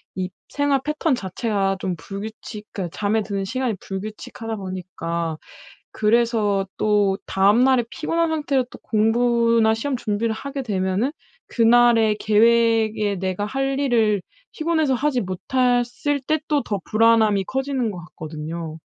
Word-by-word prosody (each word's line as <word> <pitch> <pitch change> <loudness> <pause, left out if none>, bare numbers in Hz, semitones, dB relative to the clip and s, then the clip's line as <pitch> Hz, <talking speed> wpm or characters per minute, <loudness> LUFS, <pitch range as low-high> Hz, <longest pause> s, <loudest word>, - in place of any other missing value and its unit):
이 185 -1 -2 0.2
생활 285 -1 +1
패턴 300 0 0
자체가 195 -1 -1
좀 185 -2 -2
불규칙 210 +5 -8
그러니까 180 -5 -5
잠에 215 +1 +1
드는 200 -2 -3
시간이 250 +3 -2
불규칙하다 215 +3 -6
보니까 170 -4 -4 0.5
그래서 215 -3 +1
또 205 -2 +2
다음 205 +6 +3
날에 260 -2 +4
피곤한 330 +1 -1
상태로 290 -5 0
또 - - -11
공부나 230 0 +2
시험 260 +5 -2
준비를 220 -1 -1
하게 280 +2 -5
되면은 195 +4 0 0.4
그날의 230 -2 +4
계획에 220 -1 +3
내가 190 +2 -2
할 270 +4 -1
일을 225 -7 +2 0.3
피곤해서 315 -3 0
하지 260 -1 0
못했을 245 +8 0
때 310 0 +2
또 295 -2 +2
더 205 -2 -2
불안함이 220 -3 +3
커지는 265 -1 -1
것 190 -4 -6
같거든요. 160 +1 -6
220 Hz, 300 characters per minute, -22 LUFS, 195-250 Hz, 0.5 s, 날에